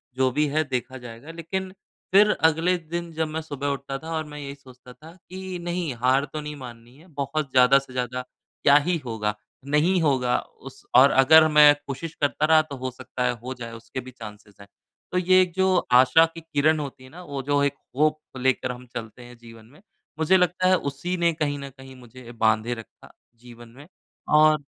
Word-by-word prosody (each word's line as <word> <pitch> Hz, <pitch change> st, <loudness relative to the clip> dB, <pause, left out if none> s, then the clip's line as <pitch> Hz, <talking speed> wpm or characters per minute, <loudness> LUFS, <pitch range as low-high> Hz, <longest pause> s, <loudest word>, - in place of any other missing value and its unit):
जो 130 Hz, 0 st, +2 dB
भी 150 Hz, +4 st, +1 dB
है 155 Hz, +2 st, 0 dB
देखा 130 Hz, -2 st, -4 dB
जाएगा। 120 Hz, +4 st, -11 dB
लेकिन 180 Hz, +3 st, -5 dB, 0.4 s
फिर 205 Hz, +3 st, +6 dB, 0.2 s
अगले 165 Hz, +3 st, 0 dB
दिन 170 Hz, +1 st, -6 dB
जब 160 Hz, 0 st, -1 dB
मैं 155 Hz, +1 st, -4 dB
सुबह 145 Hz, -3 st, -5 dB
उठता 140 Hz, -1 st, -3 dB
था 160 Hz, +4 st, -9 dB
और 155 Hz, 0 st, -2 dB
मैं 150 Hz, 0 st, -9 dB
यही 140 Hz, -1 st, -7 dB
सोचता 130 Hz, -2 st, -16 dB
था 160 Hz, +5 st, -15 dB, 0.2 s
कि 185 Hz, 0 st, -6 dB
नहीं 175 Hz, -4 st, -3 dB
हार 130 Hz, +3 st, +3 dB
तो 155 Hz, -, -4 dB
नहीं 150 Hz, 0 st, -7 dB
माननी 120 Hz, -2 st, -12 dB
है, 160 Hz, +5 st, -19 dB
बहुत 145 Hz, -2 st, -4 dB
ज़्यादा 130 Hz, +1 st, +5 dB
से 135 Hz, -2 st, -14 dB
ज़्यादा 125 Hz, 0 st, -3 dB, 0.4 s
क्या 140 Hz, -, +6 dB
ही 180 Hz, -, +1 dB
होगा, 105 Hz, -3 st, -3 dB, 0.3 s
नहीं 155 Hz, +6 st, +2 dB
होगा 130 Hz, -5 st, +1 dB
उस 135 Hz, 0 st, -14 dB
और 130 Hz, +3 st, +7 dB
अगर 155 Hz, +4 st, +6 dB
मैं 150 Hz, -1 st, +7 dB
कोशिश 155 Hz, +4 st, -6 dB
करता 145 Hz, +1 st, +1 dB
रहा 160 Hz, 0 st, +5 dB
तो 155 Hz, -2 st, -9 dB
हो 130 Hz, 0 st, -4 dB
सकता 125 Hz, 0 st, -6 dB
है 125 Hz, -, +2 dB
हो 130 Hz, +1 st, -5 dB
जाए 120 Hz, -2 st, -8 dB
उसके 115 Hz, +3 st, -8 dB
भी 130 Hz, 0 st, -9 dB
चाँसेज़ 105 Hz, -4 st, -12 dB
हैं। 100 Hz, -, -14 dB, 0.4 s
तो 180 Hz, -, -1 dB
ये 185 Hz, +1 st, +4 dB
जो 190 Hz, 0 st, +2 dB, 0.2 s
आशा 160 Hz, +5 st, +5 dB
की 165 Hz, -, -8 dB
किरण 155 Hz, 0 st, +1 dB
होती 140 Hz, -3 st, -7 dB
है 130 Hz, -, -14 dB
ना, 175 Hz, +6 st, -12 dB
वो 140 Hz, -4 st, -5 dB
जो 145 Hz, +1 st, +1 dB
एक 140 Hz, 0 st, 0 dB, 0.2 s
होप 155 Hz, +1 st, +2 dB, 0.2 s
लेकर 130 Hz, 0 st, 0 dB
हम 125 Hz, 0 st, -10 dB
चलते 115 Hz, +1 st, -7 dB
हैं 120 Hz, 0 st, -14 dB
जीवन 115 Hz, -1 st, -15 dB
में 145 Hz, +10 st, -20 dB, 0.4 s
मुझे 160 Hz, +4 st, +4 dB
लगता 180 Hz, 0 st, +1 dB
है 185 Hz, -, +5 dB
उसी 145 Hz, +5 st, -4 dB
ने 170 Hz, -1 st, +2 dB
कहीं 150 Hz, -2 st, -2 dB
न 140 Hz, 0 st, -7 dB
कहीं 135 Hz, 0 st, -13 dB
मुझे 125 Hz, -1 st, -13 dB
बाँधे 110 Hz, 0 st, +1 dB
रखा 115 Hz, -3 st, -13 dB, 0.3 s
जीवन 120 Hz, -1 st, -14 dB
में 145 Hz, +2 st, -13 dB, 0.5 s
और 155 Hz, -1 st, +5 dB
140 Hz, 205 wpm, -24 LUFS, 125-160 Hz, 0.5 s, और